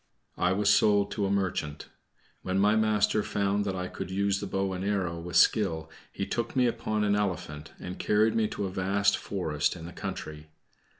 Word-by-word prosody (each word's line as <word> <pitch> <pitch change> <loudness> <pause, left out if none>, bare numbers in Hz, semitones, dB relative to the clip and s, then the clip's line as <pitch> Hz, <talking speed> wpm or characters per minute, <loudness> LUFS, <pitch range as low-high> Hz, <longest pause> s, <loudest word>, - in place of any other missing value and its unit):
I 90 - +3
was 100 +1 +3
sold 100 -1 +4
to 100 -2 -1
a - - -2
merchant. 90 -7 -2 0.5
When 95 0 -2
my 105 +2 +4
master 110 -1 +2
found 100 0 0
that 95 -2 -2
I 90 0 -3
could - - -6
use 100 +1 0
the 100 - -4
bow 95 0 -1
and 90 0 -4
arrow 95 -4 -1
with 85 +1 -7
skill, 80 -7 +3 0.2
he - - -3
took 120 +1 -3
me 130 -1 +4
upon 110 -2 -1
an 100 -1 +2
elephant, 85 -7 -3
and 90 0 -7
carried 110 +1 +3
me 110 -1 +2
to 100 - -4
a 95 - -4
vast 100 +2 +2
forest 80 -7 -1
in 85 -2 -9
the 85 - -8
country. 80 -6 -6
100 Hz, 195 wpm, -28 LUFS, 90-105 Hz, 0.5 s, sold